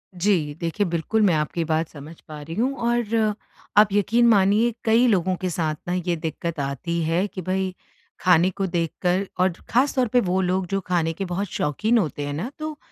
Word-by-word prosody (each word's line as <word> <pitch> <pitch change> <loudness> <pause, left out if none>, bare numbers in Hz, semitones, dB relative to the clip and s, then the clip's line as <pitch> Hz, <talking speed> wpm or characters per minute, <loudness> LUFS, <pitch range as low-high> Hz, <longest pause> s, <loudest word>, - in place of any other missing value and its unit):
जी, 175 -6 +1
देखिए 170 +5 -1
बिल्कुल 170 +6 0
मैं 200 -4 +4
आपकी 155 +2 -1
बात 160 0 0
समझ 155 +2 -11
पा 150 -1 -8
रही 165 +3 -7
हूँ 255 +6 +1 0.2
और 225 -2 +1 0.4
आप 210 0 +8
यकीन 230 +4 +3
मानिए 215 +2 +4
कई 230 +3 +4
लोगों 185 -4 +2
के 185 - -2
साथ 160 -2 -1
ना 175 - -1
ये 175 -1 -1
दिक्कत 165 0 -4
आती 140 +5 -2
है 165 +4 +1
कि 190 - -7
भई, 185 +1 -2 0.4
खाने 180 -1 +4
को 195 +1 -3
देखकर 175 +2 -1
और 185 0 +3 0.2
ख़ास 260 +4 +2
तौर 255 -2 +2
पे 250 - +6
वो 185 +1 +1
लोग 185 0 0
जो 195 +1 -1
खाने 170 -3 0
के 195 +4 -4
बहुत 185 +3 -3
शौक़ीन 210 - 0
होते 150 -7 -1
हैं 145 - -4
ना, 170 - -3
तो 310 -1 -5
185 Hz, 200 wpm, -23 LUFS, 165-210 Hz, 0.4 s, आप